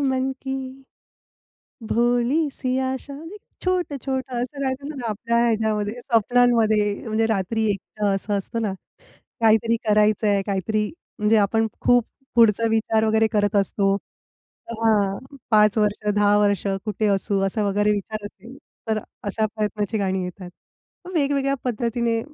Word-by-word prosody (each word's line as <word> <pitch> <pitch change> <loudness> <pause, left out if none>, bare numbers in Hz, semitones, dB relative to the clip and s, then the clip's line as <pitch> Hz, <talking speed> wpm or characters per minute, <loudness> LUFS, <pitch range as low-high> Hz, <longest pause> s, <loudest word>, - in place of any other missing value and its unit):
मन 265 -1 0
की, 265 0 -5 1.0
भोली 245 +7 +2
सी 255 0 -1
आशा, 265 +2 -3
म्हणजे 325 +8 -9 0.3
छोटं, 360 -6 0
छोटं, 260 -2 -2
असं 275 +3 -5
राहायचं 270 +1 -2
ना 240 -3 -4
आपल्या 230 +3 -1
ह्याच्यामध्ये 215 -2 0
स्वप्नांमध्ये. 230 -3 +3
म्हणजे 220 +1 +1
रात्री 220 +1 0
एकटं 200 +2 -5
असं 205 +1 -2
असतं 230 +4 -4
ना, 205 -4 -1 0.7
काहीतरी 225 +1 +4
करायचंय, 210 -1 +3
काहीतरी 210 +2 0 0.3
म्हणजे 210 +1 +3
आपण 225 +2 +2
खूप 245 -2 +4 0.3
पुढचा 230 -1 +4
विचार 220 0 +2
वगैरे 220 0 +3
करत 205 0 +1
असतो. 195 0 +2 0.7
तर 230 -1 -6
हां. 215 +5 +1 0.2
5 210 0 +5
वर्ष 210 0 +1
10 205 0 +4
वर्ष 205 -1 +1 0.2
कुठे 215 0 -1
असू 195 0 +1
असा 210 +2 -1
वगैरे 205 +1 +2
विचार 210 +1 -3
असेल, 230 +6 -11 0.3
तर 220 -1 +1 0.2
अशा 215 +2 0
प्रयत्नाची 210 0 -2
गाणी 190 -2 -1
येतात. 180 0 -7 0.6
मग 365 - -8
वेगवेगळ्या 275 -3 +1
पद्धतीने 235 -1 -1
220 Hz, 135 wpm, -23 LUFS, 205-245 Hz, 1.0 s, 5